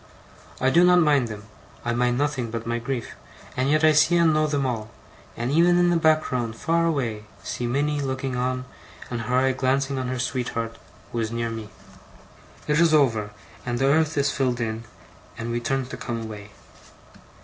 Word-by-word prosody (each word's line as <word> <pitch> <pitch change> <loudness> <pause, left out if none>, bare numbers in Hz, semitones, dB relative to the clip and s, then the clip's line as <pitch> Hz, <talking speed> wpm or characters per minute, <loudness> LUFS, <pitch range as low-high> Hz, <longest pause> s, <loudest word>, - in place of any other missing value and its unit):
I 130 +1 +2
do 170 +4 +5
not 180 0 +6
mind 145 -6 +3
them 105 -2 -8 0.4
I 120 - 0
mind 120 0 +1
nothing 140 -4 -1
but 115 0 -5
my 120 0 -1
grief 120 0 -4 0.4
and 130 +2 0
yet 155 +1 +3
I 155 - +7
see 155 +3 +4
and 165 -2 +4
know 155 0 +2
them 145 -2 0
all; 110 -4 -3 0.5
and 120 +3 -2
even 175 +3 +4
in 175 0 +4
the - - +3
background, 155 -8 +1
far 165 +6 +1
away, 115 -9 -2 0.2
see 120 - -3
Minnie 145 +4 0
looking 130 -1 -2
on, 125 +1 -1 0.5
and 120 -1 -2
her 125 +3 0
eye 130 +1 +3
glancing 135 +1 0
on 130 - -2
her 130 0 -2
sweetheart, 120 -2 -3 0.3
who 120 - -2
is 110 -1 -1
near 115 0 -2
me. 110 -2 -6 1.0
It 150 +1 +2
is 165 -2 +5
over, 115 -8 +2 0.3
and 120 -1 -2
the 135 - +1
earth 155 +2 +2
is 140 0 +2
filled 130 -3 0
in, 115 0 -3 0.5
and 115 +1 -4
we 120 - 0
turn 135 +2 -1
to 130 - -8
come 120 -2 -4
away. 105 -2 -8
130 Hz, 195 wpm, -24 LUFS, 115-150 Hz, 1.0 s, I